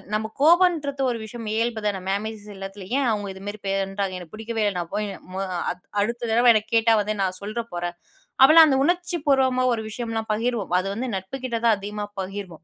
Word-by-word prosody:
நம்ம 220 +1 -2
கோபம்ன்றது 320 -4 +4
ஒரு 230 - -3
விஷயம் 225 0 -7
இயல்பு 225 -1 -1
தானே, 195 -2 -2
மேம்மே 210 +3 -1 0.3
எல்லாத்துல 195 0 -8
ஏன் 270 - +1
அவுங்க 205 -2 -2
இது 190 - -11
மாரி 210 0 -8
பண்றாங்க, 195 0 -1
எனக்கு 175 +2 -11
புடிக்கவே 225 0 -3
இல்லை. 205 - 0
நான் 170 +2 -6
போய் 210 0 -1 0.3
மோ 190 - -3 0.3
அத் 180 - -10 0.2
அடுத்த 235 +4 -2
தடவை 240 +1 +6
என்ன 215 - +2
கேட்டா 225 0 +5
வந்து 215 +1 -2
நான் 185 -1 -2
சொல்ற 215 +4 -3
போறேன். 175 0 -3 0.5
அப்போலாம் 315 +3 +9
அந்த 265 -1 +3
உணர்ச்சி 350 +1 0
பூர்வமா 260 -2 +3
ஒரு 220 - -5
விஷயம்லாம் 225 -1 -3
பகிருவோம், 225 -4 -1
அது 195 - -4
வந்து 250 +2 -3
நட்பு 190 +8 -6
கிட்ட 235 -2 -1
தான் 215 -3 +4
அதிகமா 205 +1 -5
பகிர்வோம். 190 -4 -7
220 Hz, 200 wpm, -24 LUFS, 195-240 Hz, 0.5 s, அப்போலாம்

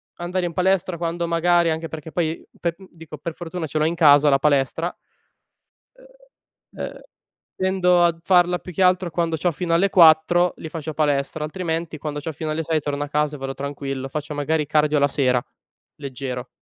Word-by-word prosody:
andare 175 +1 -2
in 170 - -4
palestra 185 -1 +1
quando 170 +1 -2
magari 170 0 +2
anche 160 +1 -3
perché 160 0 -8
poi 165 -1 -2
pe 170 -1 -1
d 190 - -14
dico 165 -2 -11
per 155 +3 -5
fortuna 175 0 -6
ce 155 0 -3
l'ho 155 - +2
in 165 +2 0
casa 145 -3 +6
la 135 - +4
palestra. 150 +4 +1 1.8
Uhm - - -6
uhm, - - -10 0.6
tendo 185 -1 +3
a 170 - +5
d 165 - -21
farla 180 0 +3
più 180 - -10
che 190 - -1
altro 180 -1 +3
quando 165 0 -1
c'ho 175 +3 0
fino 165 +1 -1
alle 195 +4 +3
4:00 175 +1 +5
lì 160 - -8
faccio 160 -2 -6
palestra, 145 0 0
altrimenti, 165 -1 -3
quando 150 0 -5
c'ho 160 +2 -5
fino 155 +1 -5
alle 160 +1 -1
6:00 160 0 0
torno 145 0 -3
a - - -8
casa 150 0 0
e - - -13
vado 135 0 -4
tranquillo. 135 -1 -5
Faccio 150 +2 -5
magari 150 +2 0
cardio 150 0 +2
la 145 0 +3
sera, 130 -3 +1 0.5
leggero. 130 -3 -6
160 Hz, 195 wpm, -22 LUFS, 145-175 Hz, 1.8 s, casa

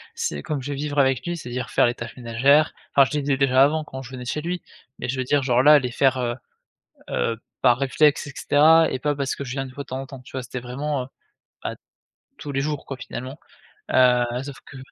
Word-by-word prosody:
c'est 70 -1 -3
comme 150 -3 -3
je 140 +3 -5
vais - - -2
vivre 145 +1 -2
avec 135 -2 +2
lui, 175 0 -2
c'est-à-dire 125 -4 -5
faire - - +3
les 120 - +1
tâches 115 +2 -8
ménagères. 130 +6 +3 0.2
Enfin 140 -1 +7
je 150 - -2
les - - 0
faisais 135 -1 +1
déjà 135 -1 +5
avant 155 +2 +1
quand 130 -3 -8
je 130 - -10
venais 125 -1 -7
chez 150 +5 -2
lui, 175 +2 -3 0.4
mais - - -4
je 130 +1 -2
veux 130 - 0
dire 140 +2 +1
genre 125 -1 +3
là, 150 +1 +8
les 125 -2 -3
faire, 130 +1 +2
heu, 120 -1 -1 0.7
heu, 115 - -1 0.2
par 120 -2 +5
réflexe, 145 +3 +2
et 145 - -9
cetera 160 +3 +5
et 130 - -2
pas 145 +2 0
parce 140 -1 -2
que 140 - -6
je 125 - -6
viens, 135 +1 -2
1 130 - -9
fois 140 +2 -7
de - - -26
temps 130 +1 -4
en - - -7
temps, 135 0 -10
tu 125 - -15
vois? 130 -1 -3
C'était 125 +1 -6
vraiment, 130 +3 -3
heu, - - -10 0.6
bah, - - -3 0.6
tous 145 - -6
les 135 0 0
jours 150 0 -3
quoi 135 - -6
finalement, 130 +3 -7 0.5
heu, 125 -1 +3
sauf 140 -1 -9
que 140 - -12
135 Hz, 255 wpm, -23 LUFS, 125-145 Hz, 0.7 s, là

